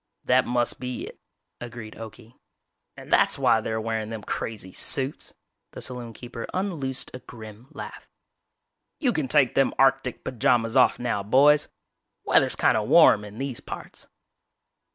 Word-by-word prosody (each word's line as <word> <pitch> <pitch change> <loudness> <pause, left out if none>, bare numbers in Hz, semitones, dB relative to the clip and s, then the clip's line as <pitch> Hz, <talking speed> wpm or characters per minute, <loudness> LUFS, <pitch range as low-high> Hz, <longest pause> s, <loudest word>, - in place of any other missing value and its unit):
"That 130 +1 +3
must 120 0 0
be 125 0 -5
it," - - -12 0.4
agreed 120 -2 -8
Okie, 115 +1 -11 0.6
"and - - -12
that's - - +4
why 120 -5 +3
they're 110 0 -3
wearin' 110 -1 -3
them 110 -2 -6
crazy 105 -5 -5
suits." 135 +1 -1 0.4
The - - -8
saloonkeeper 120 -1 -6
unloosed 155 -9 -2
a 130 - -7
grim 115 -1 -12
laugh. - - -10 0.9
"You 255 -6 +1
can 150 -4 -1
take 135 -2 +3
them 135 - +2
arctic 135 -2 +2
pajamas 115 -1 +1
off 130 - +5
now, 120 -4 -2
boys. 145 +8 +4 0.5
Weather's - - +3
kinda - - +2
warm 105 - +6
in 105 +1 -10
these 135 -2 -3
parts!" - - -10
120 Hz, 140 wpm, -25 LUFS, 110-135 Hz, 0.9 s, warm